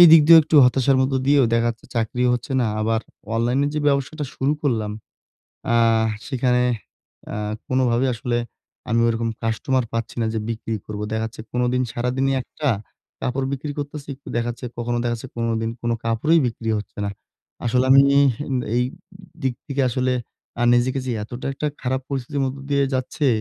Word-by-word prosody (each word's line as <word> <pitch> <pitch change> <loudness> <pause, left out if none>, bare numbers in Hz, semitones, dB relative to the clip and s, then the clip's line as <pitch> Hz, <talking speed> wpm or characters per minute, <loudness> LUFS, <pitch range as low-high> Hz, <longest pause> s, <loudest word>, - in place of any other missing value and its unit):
এইদিক 165 -2 +10
দিয়েও 165 -1 +10
একটু 155 0 +1
হতাশার 135 +1 +3
মধ্য 130 +1 +1
দিয়েও 140 -2 +5
দেখা 115 0 +3
যাচ্ছে 115 - -11
চাকরিও 125 +2 +1
হচ্ছে 125 +3 -5
না। 120 - +2
আবার 110 +1 +1 0.3
অনলাইনে 125 +5 +2
যে - - 0
ব্যবসাটা 140 +2 0
শুরু 140 +3 +1
করলাম 110 -7 0 0.8
আহ 115 -1 +4 0.2
সেখানে 125 -2 +1 0.7
আ - - -4 0.3
কোনভাবেই 130 0 +2
আসলে 120 +1 -1 0.5
আমি 115 - +3
ওরকম 115 0 0
কাস্টমার 120 +3 0
পাচ্ছি 115 -1 -3
না - - +1
যে - - 0
বিক্রি 115 0 -3
করবো। 105 0 -5
দেখা 110 0 0
যাচ্ছে 110 - -10
কোনদিন 125 +1 +1
সারাদিনই 130 +3 0
একটা 150 +2 -3 0.5
কাপড় 130 +1 -1
বিক্রি 145 +2 -3
করতেছি। 145 0 -6
একটু 140 - -14
দেখা 120 0 0
যাচ্ছে 125 +1 -7
কখনো 120 0 -1
দেখা 120 0 +1
যাচ্ছে 120 +3 -8
১৫ 115 -1 -1
দিন 115 - -1
কোন 120 - 0
কাপড়ই 150 +9 +3
বিক্রি 115 -1 -3
হচ্ছে 105 - -9
না। 100 - -1 0.5
আসলে 125 +2 +2
আমি 135 - +9
ন - - +3 0.7
এই 125 - +3 0.6
দিক 130 -2 0
থিকে 140 -1 -1
আসলে 130 +1 0 0.5
আ - - +2
নিজেকে 130 +2 +2
যে 125 - -1
এতটা 120 +5 -6
একটা 150 +3 -3 0.2
খারাপ 130 +1 0
পরিস্থিতির 140 +1 -2
মধ্য 130 +1 -2
দিয়ে 140 0 +3
যাচ্ছে 130 +3 -1
125 Hz, 175 wpm, -22 LUFS, 115-135 Hz, 0.8 s, এইদিক